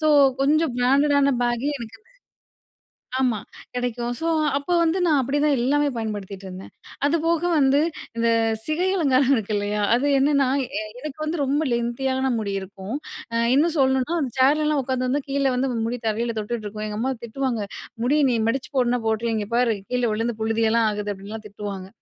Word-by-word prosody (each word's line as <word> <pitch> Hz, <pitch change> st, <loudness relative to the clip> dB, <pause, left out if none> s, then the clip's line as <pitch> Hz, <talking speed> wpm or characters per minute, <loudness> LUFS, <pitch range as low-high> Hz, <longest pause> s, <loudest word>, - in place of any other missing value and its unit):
So 310 Hz, -, +3 dB, 0.3 s
கொஞ்சம் 300 Hz, 0 st, +2 dB
பிராண்டடான 280 Hz, +2 st, +3 dB
பேக்கே 240 Hz, +4 st, 0 dB
எனக்கு 230 Hz, -2 st, -9 dB, 1.2 s
ஆமா 245 Hz, -5 st, +1 dB, 0.4 s
கிடைக்கும். 245 Hz, -1 st, -2 dB
ஸோ 330 Hz, -, -2 dB, 0.3 s
அப்போ 285 Hz, +5 st, -2 dB
வந்து 335 Hz, +2 st, +2 dB
நான் 300 Hz, -4 st, +3 dB
அப்படிதான் 290 Hz, +2 st, +1 dB
எல்லாமே 290 Hz, +4 st, +2 dB
பயன்படுத்திட்டு 205 Hz, -3 st, -5 dB
இருந்தேன். 185 Hz, +1 st, -9 dB, 0.3 s
அதுபோக 330 Hz, +2 st, +1 dB, 0.2 s
வந்து 275 Hz, +1 st, +4 dB, 0.4 s
இந்த 230 Hz, 0 st, +2 dB, 0.4 s
சிகை 335 Hz, +4 st, 0 dB
அலங்காரம் 275 Hz, -5 st, +3 dB
இருக்கு 215 Hz, -2 st, -2 dB
இல்லையா, 205 Hz, +1 st, -1 dB
அது 275 Hz, +4 st, +1 dB
என்னன்னா 280 Hz, -1 st, +3 dB, 0.5 s
எனக்கு 305 Hz, +1 st, -7 dB
வந்து 320 Hz, +2 st, -2 dB
ரொம்ப 285 Hz, +3 st, +1 dB
லென்த்தியான 260 Hz, +2 st, 0 dB
முடி 205 Hz, -2 st, -2 dB
இருக்கும். 195 Hz, +5 st, -7 dB, 0.6 s
இன்னும் 320 Hz, +3 st, +3 dB
சொல்லணுனா 265 Hz, +4 st, +2 dB
அந்த 255 Hz, -4 st, -2 dB
சேர்லலாம் 300 Hz, +2 st, +3 dB
உட்காந்து 255 Hz, -1 st, -1 dB
வந்து 285 Hz, +2 st, +1 dB
கீழே 275 Hz, -1 st, +1 dB
வந்து 260 Hz, +1 st, 0 dB, 0.2 s
முடி 245 Hz, +1 st, -3 dB
தரையில 230 Hz, +2 st, -1 dB
தொட்டுட்டு 215 Hz, 0 st, -4 dB
இருக்கும். 215 Hz, +1 st, -5 dB
எங்க 210 Hz, 0 st, -4 dB
அம்மா 265 Hz, +2 st, 0 dB
திட்டுவாங்க, 240 Hz, -1 st, -2 dB, 0.4 s
முடியை 295 Hz, +3 st, +3 dB
நீ -, -, +1 dB
மடிச்சு 265 Hz, +5 st, -2 dB
போடுனா 245 Hz, -1 st, +2 dB
போட்டுரு, 225 Hz, +1 st, 0 dB
இங்க 205 Hz, -1 st, -3 dB
பார் 240 Hz, -2 st, +3 dB, 0.2 s
கீழே 250 Hz, -1 st, +1 dB
விழுந்து 225 Hz, +1 st, -2 dB
புழுதியெல்லாம் 225 Hz, 0 st, +2 dB
ஆகுது 210 Hz, 0 st, -3 dB
அப்படின்லாம் 210 Hz, +3 st, -9 dB
திட்டுவாங்க. 200 Hz, -2 st, -6 dB
250 Hz, 160 wpm, -23 LUFS, 220-280 Hz, 1.2 s, வந்து